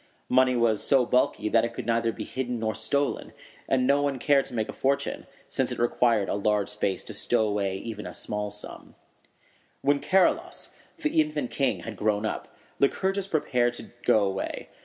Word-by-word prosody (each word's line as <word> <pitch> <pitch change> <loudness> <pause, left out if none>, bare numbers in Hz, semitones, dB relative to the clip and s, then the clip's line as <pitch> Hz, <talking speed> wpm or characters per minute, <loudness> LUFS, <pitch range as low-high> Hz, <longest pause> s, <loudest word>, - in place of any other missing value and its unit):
Money 130 0 +4
was 115 -3 +2
so 135 -3 +4
bulky 125 -3 +1
that 115 +1 +3
it 115 0 -3
could - - -5
neither 115 0 +1
be - - -6
hidden 125 -2 -3
nor 110 -1 -1
stolen; 140 +7 -1 0.4
and 130 -1 +3
no 140 +2 +4
one 140 -2 0
cared 140 +2 +3
to - - -12
make 110 -2 0
a - - -6
fortune, 140 +1 -1 0.2
since - - -1
it - - -3
required 120 -3 +2
a - - -1
large 105 0 +1
space 100 -3 -1
to - - -8
stow 110 - +1
away 100 -2 -1
even 105 0 -6
a - - -6
small 105 0 -3
sum. 105 +1 -7 0.9
When 140 0 +3
Charilaus, 195 - +1 0.3
the 315 0 +2
infant 300 -4 -2
king, 135 -3 0
had 110 -3 -7
grown 105 +1 +1
up, - - -3 0.3
Lycurgus 190 +7 +1
prepared 125 -8 +1
to - - -10
go 110 -4 +4
away. 95 -1 -3
120 Hz, 185 wpm, -27 LUFS, 110-140 Hz, 0.9 s, Money